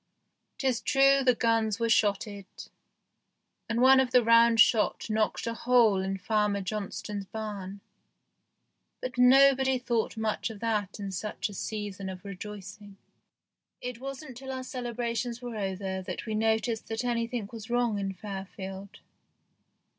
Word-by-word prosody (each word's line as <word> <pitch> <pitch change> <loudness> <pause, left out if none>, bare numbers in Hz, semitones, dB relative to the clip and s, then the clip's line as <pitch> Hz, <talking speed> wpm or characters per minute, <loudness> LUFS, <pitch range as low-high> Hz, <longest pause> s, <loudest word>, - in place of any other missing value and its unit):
Tis 255 -4 0
true 275 +1 +4
the 250 -2 +4
guns 225 -2 +1
were 230 - +1
shotted, 205 -2 +1 1.2
and 230 +1 0
one 265 +1 +7
of 260 -1 +2
the 250 -1 +4
round 230 0 +5
shot 220 0 +3
knocked 215 0 0
a 230 - -2
hole 230 -4 +3
in 190 0 -2
THE - - -3
GHOST - - -21
SHIP - - -30
9 - - -27
Farmer 205 -1 +1
Johnstone's 205 0 -4
barn, 205 -3 -6 1.2
but 250 -1 -5
nobody 265 +1 +6
thought 235 -2 -1
much 220 +1 -1
of 220 -2 -9
that 210 -3 -2
in 200 -1 -4
such 210 +3 -3
a - - -9
season 200 -1 -5
of 185 +1 -9
rejoicing. 205 0 -9 0.8
It 250 -1 -6
wasn't 270 0 -7
till 265 +1 -7
our 260 -1 -4
celebrations 240 -2 -3
were 245 -2 -6
over 190 -2 -3
that 185 - -6
we 220 - -3
noticed 220 +1 0
that 225 +2 -3
anything 235 -2 -1
was 225 -1 -9
wrong 240 -3 +1
in 195 -1 -2
Fairfield. 195 0 -8
220 Hz, 155 wpm, -28 LUFS, 200-245 Hz, 1.2 s, one